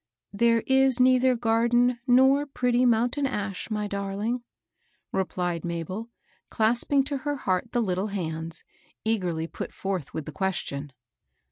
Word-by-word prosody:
There 230 +2 +3
is 265 -1 +4
neither 255 0 +4
garden 235 +1 +2
nor 265 +3 +5
pretty 250 -2 +1
mountain 245 +5 +2
ash, 205 -6 -4
my 210 -1 -2
darling," 200 +4 -2 0.7
repUed 180 -3 -1
Mabel, 175 +6 -4 0.4
clasping 240 +5 +2
to 280 +1 -3
her 290 +2 -2
heart 195 -3 -1
the 240 - +1
little 190 0 -1
hands, 165 -5 -4 0.4
eagerly 180 -7 0
put - - -6
forth 190 -7 -4
with 160 - -5
the - - -6
question. 150 -6 -3
225 Hz, 130 wpm, -26 LUFS, 185-250 Hz, 0.7 s, nor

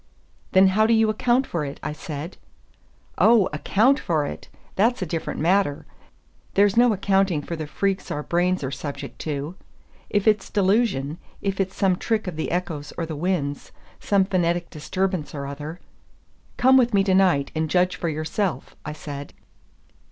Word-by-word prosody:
"Then 190 0 +6
how 215 +3 +3
do 230 - +4
you 220 -1 +3
account 245 +4 +2
for 170 -9 -3
it?" 140 -1 -6
I 150 - -3
said. 155 +2 -7 0.8
"Oh, 215 +1 +6
account 225 - +3
for 155 -4 0
it! - - -7 0.3
that's 225 +2 +2
a - - -2
different 165 0 -4
matter; 170 -3 +1 0.7
there's 200 0 +4
no 240 0 +5
accounting 195 -5 +1
for 170 - -4
the 155 -2 -5
freaks 195 +5 -1
our 150 - -3
brains 180 +1 +1
are 135 - -2
subject 140 +1 -6
to. 150 +1 -4 0.6
If 205 +1 0
it's 215 -1 +3
delusion, 190 - +1 0.2
if 195 -1 -1
it's 195 0 -1
some 190 -2 +2
trick 225 +1 -1
of 180 -4 -4
the 160 - -3
echoes 160 -5 -3
or 165 - -1
the 160 -1 -5
winds, 150 -3 -2 0.3
some 200 -2 +2
phonetic 175 -2 0
disturbance 180 +2 -2
or 140 -1 -4
other 150 +4 -7 0.4
" - - -36 0.3
"Come 260 +1 +6
with 240 -4 +3
me 195 - +4
to 195 -1 +1
night, 180 -8 +3
and 160 0 -1
judge 180 +1 +2
for 170 - -2
yourself," 160 +5 -3
I 150 - -5
said. 145 -2 -8
180 Hz, 175 wpm, -24 LUFS, 150-200 Hz, 0.8 s, Then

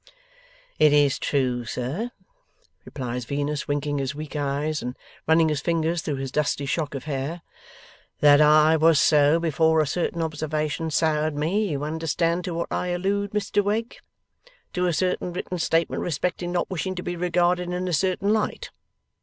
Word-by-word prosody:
'It 155 -1 +6
is 145 -1 +3
true, 125 -4 0
sir,' 130 - -3 0.8
replies 125 -3 -5
Venus, 145 +2 -2
winking 145 0 -1
his 135 0 -3
weak 150 0 -7
eyes, 145 +1 -1
and 125 +1 -5 0.3
running 160 0 +4
his 150 -2 -1
fingers 165 0 0
through 150 - -3
his 135 -1 -5
dusty 145 -1 0
shock 145 0 -2
of 135 - -5
hair, 150 +3 -4 0.8
'that 145 0 +6
I 155 +1 +6
was 160 -1 +5
so, 150 +1 +4
before 160 0 +2
a 155 - +3
certain 170 +2 -1
observation 155 0 -2
soured 155 0 +1
me. 190 +8 0
You 145 -2 -3
understand 165 +3 -1
to 175 -3 -4
what 170 - -3
I - - -1
allude, 195 +3 -1
Mr 205 0 0
Wegg? 220 +3 -2 0.8
To 180 0 0
a - - +2
certain 180 +1 -1
written 180 0 -4
statement 165 0 +1
respecting 175 +2 -2
not 175 +2 -1
wishing 185 +1 -2
to 180 - -5
be 175 - -3
regarded 175 0 +1
in 180 +1 -2
a 180 - -2
certain 190 +5 +1
light. 215 -1 -2
160 Hz, 165 wpm, -24 LUFS, 145-175 Hz, 0.8 s, It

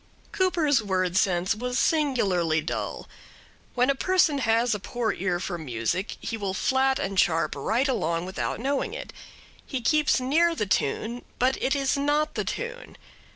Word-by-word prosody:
Cooper's 335 - +2
word 185 -3 -1
sense 185 -1 +2
was 250 +3 -3
singularly 200 - +2
dull. 155 - -4 0.7
When 250 +2 +3
a - - +1
person 320 -1 +2
has 230 -1 +2
a 210 - -2
poor 235 +3 -2
ear 180 -2 -1
for 175 -1 -4
music 130 - -2
he 225 - -4
will 195 -3 -3
flat 265 +4 +2
and 195 0 -1
sharp 165 -2 +2
right 225 - 0
along 170 -9 -1
without 185 - -3
knowing 280 - -1
it. - - -7 0.5
He 265 - -4
keeps 300 +4 +2
near 325 +7 +2
the 210 - -1
tune, 220 - -1
but 255 +1 +2
it 270 +2 +1
is 275 0 +1
not 295 +2 +1
the - - -2
tune. - - -5
240 Hz, 160 wpm, -26 LUFS, 185-280 Hz, 0.7 s, When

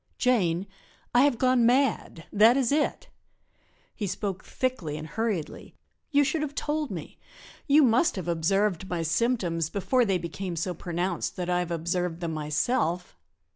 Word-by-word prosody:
"Jane, 190 -8 +2 0.5
I 245 - +6
have 280 -5 +2
gone 255 0 +3
mad 245 -8 +1
that 225 +5 +6
is 260 -3 +1
it." 305 +11 0 0.9
He 210 - -3
spoke 190 0 -3
thickly 185 - -3
and 155 - -6
hurriedly. 210 -4 -3 0.3
"You 290 -1 +4
should 295 +3 0
have 290 -2 -4
told 300 0 -2
me; 170 -7 -8 0.5
you 295 +1 +6
must 250 +6 +3
have 185 -4 -5
observed 190 +3 0
my 170 -2 -2
symptoms 165 -3 0
before 245 +7 +1
they 195 -5 +1
became 175 +1 -5
so 175 +3 -2
pronounced 175 +1 -3
that 180 -1 -3
I 180 - +2
have 175 -1 -2
observed 170 0 -2
them 170 -2 -3
myself. 160 - -1
190 Hz, 155 wpm, -27 LUFS, 170-250 Hz, 0.9 s, I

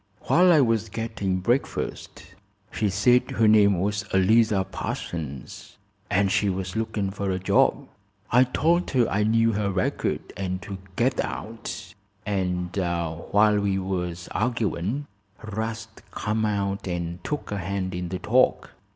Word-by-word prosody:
"While 180 +1 +4
I 155 -4 +6
was 115 -3 +1
gettin' 100 -4 -2
breakfast. 105 -5 -2 0.4
She 105 -2 0
said 120 +6 +3
her 110 +2 +2
name 100 -3 +5
was 100 +1 -1
Eliza 105 +1 +4
Parsons, 75 -7 -6 0.3
an' 100 +1 +2
she 100 +1 +2
was 95 0 -3
looking 110 -3 -1
fer 100 0 -3
a 95 - 0
job. 95 - +2 0.4
I 125 +2 +6
told 170 +7 +1
her 125 -4 +2
I 100 - 0
knew 115 +2 +3
her 105 -1 -1
record 95 -1 -2
an' 95 -1 -2
to 100 -2 -6 0.2
get 130 +2 +1
out, 115 0 -6 0.3
and 90 -3 -2
while 85 +4 +1
we 100 -1 0
was 90 -2 -3
arguin' 115 - -1 0.4
'Rast 110 +1 -5
come 110 +1 -1
out 100 -2 -1
and 85 0 -4
took 150 -7 -4
a 100 - -2
hand 95 +1 -3
in 90 0 -4
the 95 - -3
talk. 125 +7 +2
100 Hz, 140 wpm, -25 LUFS, 95-110 Hz, 0.4 s, I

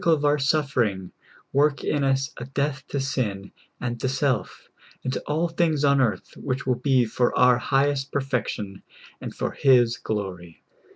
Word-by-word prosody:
39 165 - +4
tide - - -3
of 145 - -2
our 145 0 +3
suffering, 130 - 0 0.4
work 145 +1 +2
in 145 -2 0
us 135 0 +1
a 125 - -6
death 140 +1 -2
to 140 - -3
sin 110 -8 -2 0.3
and 120 -1 -3
to 130 - -1
self, 135 -1 -1 0.4
and 130 - -2
to - - -3
all 160 +3 +1
things 165 -3 0
on 140 -1 +4
earth 120 -5 -1
which 130 -1 -3
will 130 - +2
be 130 0 +2
for 120 +2 0
our 125 -1 +5
highest 140 +1 +1
perfection 125 -8 -3 0.4
and - - -7
for - - -2
His 120 -3 +4
glory. 95 -7 -5
135 Hz, 175 wpm, -24 LUFS, 120-140 Hz, 0.4 s, our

